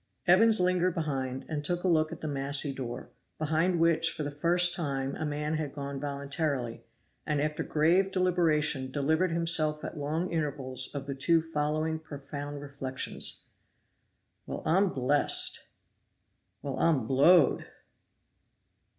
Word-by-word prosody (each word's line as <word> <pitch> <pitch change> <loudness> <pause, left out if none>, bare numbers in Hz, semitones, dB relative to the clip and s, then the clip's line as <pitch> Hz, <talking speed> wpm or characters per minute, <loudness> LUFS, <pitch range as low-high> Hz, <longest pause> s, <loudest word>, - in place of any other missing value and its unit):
Evans 215 +5 +5
lingered 180 -1 +1
behind, 135 -5 -3
and 150 -2 -4
took 175 +3 -1
a - - +1
look 155 -3 +2
at - - -8
the 155 - -4
massy 140 0 +2
door, 125 -3 -7 0.3
behind 160 +3 0
which 165 0 +3
for 155 - -5
the 145 - -4
first 175 +4 +3
time 135 -5 -3
a 155 - -3
man 150 +1 -2
had 150 -3 -4
gone 140 -1 -6
voluntarily, 140 -3 -3 0.4
and 150 -1 -1
after 150 +1 -2
grave 175 +5 +2
deliberation 160 -7 +1
delivered 160 +6 0
himself 165 -2 +2
at - - -6
long 155 +5 -2
intervals 135 -5 -1
of 140 -1 -4
the 140 - -4
two 145 +5 +2
following 155 0 -2
profound 145 -1 -7
reflections: 135 -2 -4 1.0
"Well! - - -6
I'm 190 +4 +3
blest!!" 140 0 +2 1.0
"Well! 135 -2 -4
I'm 150 -8 +2
blowed!!" 140 +9 +4
150 Hz, 135 wpm, -29 LUFS, 140-165 Hz, 1.0 s, Evans